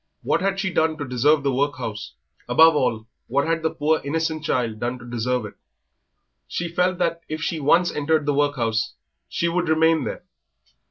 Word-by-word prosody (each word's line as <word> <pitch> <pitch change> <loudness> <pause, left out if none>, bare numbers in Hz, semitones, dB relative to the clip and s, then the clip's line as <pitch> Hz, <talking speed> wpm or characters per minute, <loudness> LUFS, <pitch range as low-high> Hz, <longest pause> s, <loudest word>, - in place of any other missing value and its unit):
What - - +1
had 195 0 0
she 190 -2 -2
done 160 0 +1
to 145 - -4
deserve 140 +4 +2
the 140 -1 +1
workhouse? 130 -6 -3 0.4
Above 160 0 +6
all, 120 -6 0 0.2
what 140 +4 +1
had 165 0 0
the 160 - +1
poor, 155 +1 0
innocent 160 +2 -2
child 115 -7 -1
done 120 +2 -2
to 120 - -12
deserve 120 0 -1
it? 105 - -9 0.9
She 170 0 -3
felt 180 +2 +1
that 170 -1 -1
if 155 0 -3
she 165 - -2
once 170 +5 +3
entered 150 +1 0
the 145 - +1
workhouse 125 -6 0 0.3
she 170 - -1
would 175 0 0
remain 160 0 +3
there. - - -5
150 Hz, 180 wpm, -23 LUFS, 125-165 Hz, 0.9 s, Above